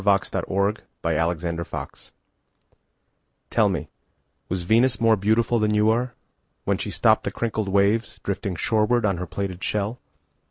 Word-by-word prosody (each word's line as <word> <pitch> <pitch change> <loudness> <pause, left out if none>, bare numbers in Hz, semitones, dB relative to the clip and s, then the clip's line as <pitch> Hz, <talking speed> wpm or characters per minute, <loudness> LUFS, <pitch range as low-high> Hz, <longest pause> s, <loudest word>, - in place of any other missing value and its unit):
Venus 100 -1 +2
Transiens 100 +2 0 0.3
By 85 - +1
Amy 85 +1 -1
Lowell - - -6 1.6
TELL 110 -3 +4
me, 80 -5 -3 0.6
Was 90 -1 -2
Venus 115 +7 +3
more 115 -1 +5
beautifulThan 110 +1 +2
you 105 +1 +4
are, 125 +2 -1 0.5
When - - 0
she - - -3
stoppedThe - - +2
crinkled 110 -3 -2
waves, 100 +4 +2
Drifting 100 -1 -2
shorewardOn 105 -1 +1
her 90 - -4
plaited 95 0 -4
shell? 105 +3 -1
100 Hz, 130 wpm, -24 LUFS, 95-110 Hz, 1.6 s, more